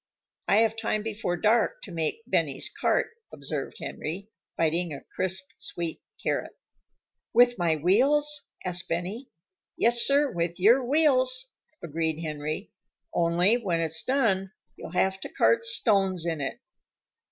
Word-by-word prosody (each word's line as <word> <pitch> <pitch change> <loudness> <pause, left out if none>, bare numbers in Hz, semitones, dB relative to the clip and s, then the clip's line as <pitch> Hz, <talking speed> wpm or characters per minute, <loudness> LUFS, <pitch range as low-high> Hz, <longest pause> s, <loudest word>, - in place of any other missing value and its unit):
"I 210 - +4
have 225 -1 +2
time 215 -1 -2
before 215 -5 -3
dark 220 +3 +1
to 195 - -9
make 165 +6 -2
Benny's 155 - -1
cart," - - 0 0.2
observed 140 -1 -5
Henry, 195 +7 -6 0.3
biting 165 +1 0
a 140 - -7
crisp, 190 0 -2
sweet 170 -2 -5 0.2
carrot. - - -2 0.8
"With 245 -1 +5
my 170 -2 +2
wheels?" 280 - +3 0.2
asked 180 -1 -3
Benny. 190 +10 -4 0.5
"Yes, 235 0 +4
sir, 280 +2 +4
with 170 0 -2
your 235 +8 +5
wheels," 260 -2 +3 0.3
agreed 160 -1 -2
Henry. 155 +3 -4 0.4
"Only, 175 +6 +3
when 185 -8 -1
it's 160 -1 +1
done, 205 -8 0 0.2
you'll - - -9
have 190 +1 +1
to - - -7
cart 465 0 +2
stones 195 - +2
in 165 -3 -2
it." 135 - -4
190 Hz, 135 wpm, -27 LUFS, 165-240 Hz, 0.8 s, With